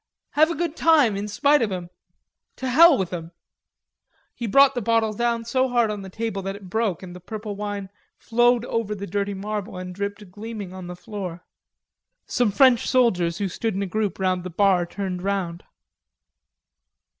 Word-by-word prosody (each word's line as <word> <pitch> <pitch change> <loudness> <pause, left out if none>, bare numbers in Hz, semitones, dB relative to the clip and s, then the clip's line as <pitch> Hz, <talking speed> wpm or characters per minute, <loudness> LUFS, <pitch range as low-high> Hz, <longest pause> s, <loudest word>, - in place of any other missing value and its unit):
Have 310 +2 +4
a 335 - -2
good 335 0 -2
time, 300 -11 +4
in 200 +1 -3
spite 280 +8 +3
of 220 -3 0
'em. 175 -2 -5 0.6
To 260 - -4
hell 305 +4 +7
with 185 -3 -2
'em." 165 -1 -6 1.0
He 235 - -5
brought 275 +6 +6
the 245 - -2
bottle 225 0 +1
down 235 +1 -1
so 255 +2 +1
hard 240 -3 +2
on 210 -1 -5
the 190 - -8
table 220 0 -3
that 195 +1 -4
it 195 -3 -12
broke 220 -6 -1
and 180 -1 -9
the - - -9
purple 210 +2 -6
wine 205 -1 -5 0.3
flowed 240 +1 +2
over 225 -3 -2
the 200 0 -6
dirty 200 +1 -2
marble 205 0 -4
and 180 0 -6
dripped 200 0 -5
gleaming 210 -2 -7
on 185 -1 -8
the 180 - -6
floor. 180 -3 -7 0.8
Some 245 -3 +1
French 250 +2 +4
soldiers 180 -10 +2
who 200 - -1
stood 220 +3 -3
in 200 - -1
a - - -1
group 210 +1 -2
round 185 -2 0
the 185 - -5
bar 185 -1 +2
turned 185 -1 -4
round. 185 -3 -2
205 Hz, 185 wpm, -24 LUFS, 185-235 Hz, 1.0 s, hell